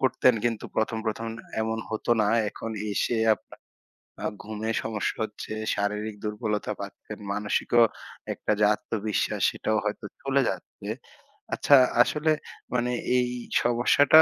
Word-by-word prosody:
করতেন, 130 -2 +4
কিন্তু 115 -2 0
১ম, 110 0 +1
১ম 115 +1 -2 0.3
এমন 110 0 -1
হতো 110 +2 -2
না। 105 - +3 0.2
এখন 115 +2 -6 0.2
এসে 115 +4 +1 0.2
আপনার - - -17 0.7
আ - - +1 0.2
ঘুমের 110 +1 -3
সমস্যা 110 -2 -2
হচ্ছে, 105 0 -7 0.2
শারীরিক 105 +1 -2
দুর্বলতা 105 0 -1
পাচ্ছেন, - - -8
মানসিকও 105 +3 +2 0.5
একটা - - -1
যে 105 - +4
আত্মবিশ্বাস, 105 0 -2
সেটাও 110 - -1
হয়তো 105 0 -3 0.2
চলে 135 0 +2
যাচ্ছে। - - -6 0.7
আচ্ছা, 145 - +6 0.3
আসলে 150 +4 +1 0.4
মানে 125 0 +1 0.3
এই 125 0 +2 0.4
সমস্যাটা 125 +6 +6
110 Hz, 125 wpm, -27 LUFS, 105-120 Hz, 0.7 s, আচ্ছা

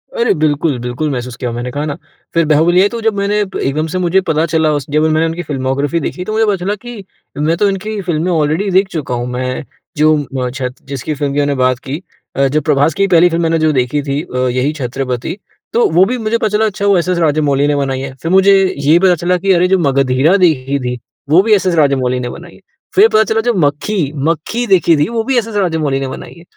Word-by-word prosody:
अरे 470 -2 +2
बिल्कुल-बिल्कुल 145 -2 -1
महसूस 125 -1 -5
किया। 125 0 -4
मैंने 120 +2 -5
कहा 145 +3 -3
ना, 150 0 -4 0.4
फिर 165 -1 +2
बाहुबली 160 +4 +3
आई, 200 - +4
तो 235 +1 -5
जब 225 -1 +1
मैंने 200 +1 0
एकदम 155 -6 -2
से - - -1
मुझे 180 +2 +2
पता 160 +1 +2
चला, 160 -1 +1
उसके 145 +1 -1
मैंने 155 +1 +2
उनकी 165 +2 -3
फ़िल्मोग्राफ़ी 140 +3 -2
देखी, 180 +4 -4
तो 215 - -4
मुझे 220 +1 +2
पता 205 -2 +1
चला 205 +2 0
कि 240 -4 -8 0.3
मैं 160 +3 0
तो 205 - +2
इनकी 205 +2 -4
फ़िल्में 175 -1 -1
ऑलरेडी 160 +5 0
देख 190 +2 +3
चुका 145 -6 -3
हूँ। 120 0 -3
मैं 130 +3 -3 0.3
जो 155 +1 +4 0.3
अ, 125 - -2
छत 125 -1 -5
जिसकी 140 +2 -4
फिल्म 140 -1 -2
की 145 - 0
मैंने 145 -1 0
बात 130 -1 +1
की 145 +6 -4 0.3
अ, 135 +1 +2
जब 150 +3 0
प्रभास 150 +1 +2
की 195 0 +1
पहली 175 -1 +5
फिल्म 170 0 -1
मैंने 165 0 +1
जो 155 0 +2
देखी 130 +3 0
थी 140 +1 -2
अ, 140 -6 -7
यही 130 +5 0
छत्रपति, 130 - -4 0.4
तो 235 - +3
वो 180 +4 +5
भी 250 +4 -2
मुझे 225 0 -1
पता 220 - 0
चला 220 - +2
अच्छा 200 -1 -2
वो 200 -2 +4
एस.एस. 180 +1 0
राजमौली 145 -3 +1
ने 145 - +1
बनाई 135 -2 -1
है। 135 0 -6
फिर 165 - -2
मुझे 195 +1 +5 0.2
ये 145 +4 +4
पता 185 -1 +4
चला 175 +2 0
कि 195 +2 0
अरे 180 0 +3
जो 190 - +3
मगधीरा 140 +2 +2
देखी 140 -6 +1
थी, 125 -1 -3 0.3
वो 165 +5 +6
भी 220 - +3
एस.एस. 185 -3 +2
राजमौली 135 -5 +1
ने 125 -1 -4
बनाई 170 +6 -10
है। - - -18 0.4
फिर 410 +3 +7
पता 220 - +5
चला 220 +1 0
जो 240 +1 0
मक्खी, 150 -1 0
मक्खी 165 - -1
देखी 175 -4 +4
थी, 145 - +1
वो 230 -1 -1
भी 260 +1 0
एस.एस. 225 -2 -2
राजमौली 160 -8 0
ने 135 - -3
बनाई 130 - -8
है। 170 - -14
155 Hz, 235 wpm, -15 LUFS, 140-190 Hz, 0.4 s, फिर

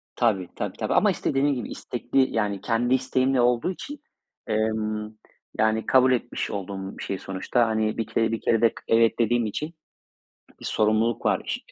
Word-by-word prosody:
Tabii, 105 -7 +1
tabii, - - -4
tabii - - -1
ama - - +4
işte - - -2
dediğim 140 +1 +2
gibi, 120 - -5
istekli, 130 +2 -1
yani 105 -3 0
kendi 120 +3 +1
isteğimle 130 0 +2
olduğu 120 +7 +2
için, 290 +10 -8 0.5
emm, 110 -1 -1 0.5
yani 110 +1 +2
kabul 130 0 +5
etmiş 120 -1 -1
olduğum 95 -1 -5
bir - - -7
şey 95 - -3
sonuçta. 95 +5 0
Hani 110 -1 0
bir 115 - -2
kere, 115 0 +1
bir 115 - -2
kere 115 - +2
de 115 - +6
k - - -11
evet 115 0 +3
dediğim 120 0 +2
için 150 +10 -4 0.9
bir - - -9
sorumluluk 110 +1 +1
var - - 0
115 Hz, 175 wpm, -25 LUFS, 110-125 Hz, 0.9 s, de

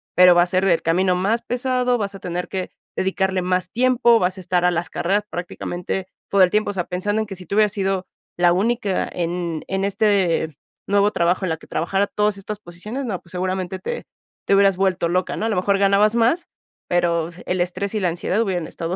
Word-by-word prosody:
pero 180 0 +8
va 175 - +5
a - - +4
ser 185 +1 +1
el 175 -4 +3
camino 180 +3 +2
más 205 +6 +1
pesado. 250 0 0
Vas 200 -1 -3
a - - -8
tener 180 0 -4
que 185 -2 -4 0.2
dedicarle 190 0 0
más 185 0 0
tiempo, 240 -1 +4
vas 185 0 0
a - - -7
estar 180 -1 0
a 180 - +4
las 175 0 -2
carreras 200 +4 0
prácticamente 180 +1 -4 0.2
todo 200 - +3
el 185 - +7
tiempo, 210 +2 +1
o - - -8
sea, 180 -3 -2
pensando 205 +4 -1
en - - -2
que 195 - -7
si 180 0 -11
tú 200 - -4
hubieras 210 -2 +3
sido 195 -2 -1 0.3
la 175 0 +4
única 205 0 0
en 170 -2 -3
en 190 0 -1
este 190 -7 +1 0.3
nuevo 205 +1 +3
trabajo, 175 +3 +1
en 180 - -1
la 160 - -1
que - - -16
trabajara 195 +4 0
todas 210 -1 0
estas 205 +1 -6
posiciones, 210 +9 -6
no, 195 -6 -3
pues, - - -20
seguramente 185 0 -2
te 480 - -5 0.4
te - - +2
hubieras 195 -2 +4
vuelto 185 -3 +1
loca, 180 +1 0
¿no? 215 - -2
A 225 - 0
lo 210 - 0
mejor 195 +2 +2
ganabas 200 +2 +3
más, 235 +9 +2 0.4
pero 170 -2 +1 0.2
el 180 -1 0
estrés 195 +3 -2
y 215 - +1
la 185 - +1
ansiedad 175 +5 -1
hubieran 185 -7 -1
estado 170 +2 -4
190 Hz, 220 wpm, -21 LUFS, 180-205 Hz, 0.4 s, pero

